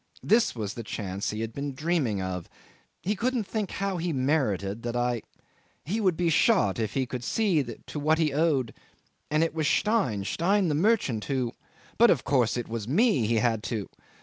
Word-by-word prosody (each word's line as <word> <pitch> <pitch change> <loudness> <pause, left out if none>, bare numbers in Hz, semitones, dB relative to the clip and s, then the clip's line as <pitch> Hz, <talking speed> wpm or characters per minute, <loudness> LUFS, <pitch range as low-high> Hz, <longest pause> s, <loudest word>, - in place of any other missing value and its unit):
This 225 - +3
was 105 -3 -4
a 115 - -5
chance 100 -3 -4
he 105 +1 -3
had 115 0 -4
been 140 +1 -4
dreaming 145 - 0
of. 90 -2 -4 0.5
He 205 +3 0
couldn't 245 +3 0
think 210 0 -3
how 195 -2 -2
he 170 0 -1
merited 130 - 0
that 120 0 -4
I... 120 -1 0 0.6
He 210 +8 -1
would 185 -5 +2
be 175 -2 +1
shot 150 - +3
if 110 -1 -2
he 135 -1 +1
could 125 0 -5
see 195 - +2
to 120 +4 -7
what 155 +2 +2
he 155 -3 +1
owed... 145 -6 +1 0.6
And 155 +2 +2
it 165 - -1
was 155 -2 0
Stein, 190 - +1
Stein 190 - +1
the - - +1
merchant, 150 - +1
who... 130 -4 -1 0.5
but - - +7
of - - +3
course 125 -4 +2
it 120 - -3
was 115 -2 -4
me 150 - +3
he 115 - +1
had 115 -1 +1
to 105 -3 -3
135 Hz, 195 wpm, -27 LUFS, 115-175 Hz, 0.6 s, but